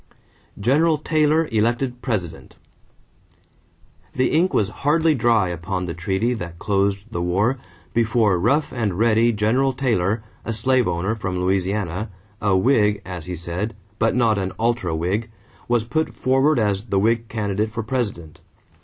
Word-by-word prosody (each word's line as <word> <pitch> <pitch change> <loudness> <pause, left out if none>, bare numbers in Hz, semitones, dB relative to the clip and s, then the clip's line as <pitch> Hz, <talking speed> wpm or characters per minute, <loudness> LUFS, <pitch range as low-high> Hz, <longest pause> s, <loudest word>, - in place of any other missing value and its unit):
=General 150 +9 +3
Taylor 155 +1 +2
Elected 120 +3 0
President.= 90 -10 -4 1.6
The 130 - +2
ink 175 +4 +3
was 100 - +1
hardly 155 +3 +3
dry 115 -7 +2
upon 90 +2 -3
the 85 - -4
treaty 95 +7 -1
that 85 -7 -6
closed 100 +1 0
the 100 - -3
war 100 +9 +1 0.3
before 115 -5 +2
"rough 140 - +1
and 110 -7 -1
ready" 115 +1 +3
General 115 +5 +1
Taylor, 110 -5 0 0.2
a 115 - -3
slave 125 +3 +2
owner 85 +5 -1
from 95 -5 -3
Louisiana, 95 +1 -1 0.3
"a 100 -2 +3
Whig," 105 -2 +2
as 90 -4 -6
he 90 - -4
said, 85 +6 -4 0.2
"but 115 - +2
not 115 -4 +3
an 95 0 -3
ultra 115 -7 0
Whig," 95 +8 -1 0.4
was 120 -2 +2
put 155 +8 -2
forward 135 +3 +2
as 105 -2 0
the 100 -4 -1
Whig 115 +3 +1
candidate 105 -1 -2
for 115 0 -4
President. 105 -10 -4
110 Hz, 145 wpm, -22 LUFS, 95-120 Hz, 1.6 s, =General